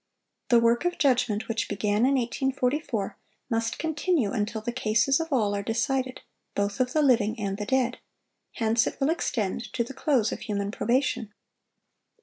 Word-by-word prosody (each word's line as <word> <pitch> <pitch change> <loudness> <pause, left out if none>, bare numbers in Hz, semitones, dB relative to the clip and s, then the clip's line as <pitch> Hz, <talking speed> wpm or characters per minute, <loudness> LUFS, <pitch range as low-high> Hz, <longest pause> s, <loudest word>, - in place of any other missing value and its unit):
The 240 -2 +6
work 235 +3 +3
of 355 0 0
judgment 245 -6 +2
which 225 0 -2
began 210 +3 +1
in 275 - +3
1844, 255 -2 -1 0.3
must 225 0 0
continue 315 - 0
until 220 -1 -2
the 240 - -3
cases 240 +3 +2
of 325 0 -4
all 215 -7 +2
are 200 - -1
decided, 255 +4 -1 0.3
both 200 0 -1
of 250 0 +1
the 310 - +3
living 225 -4 +3
and 200 -1 -2
the 210 - -4
dead; 255 -2 +1 0.5
hence 225 0 +2
it - - -5
will 275 +2 +2
extend 235 - -2
to 235 - +1
the 240 - -9
close 260 -7 +1
of - - -4
human 200 -1 -3
probation. 235 -2 0
235 Hz, 165 wpm, -27 LUFS, 215-265 Hz, 0.5 s, The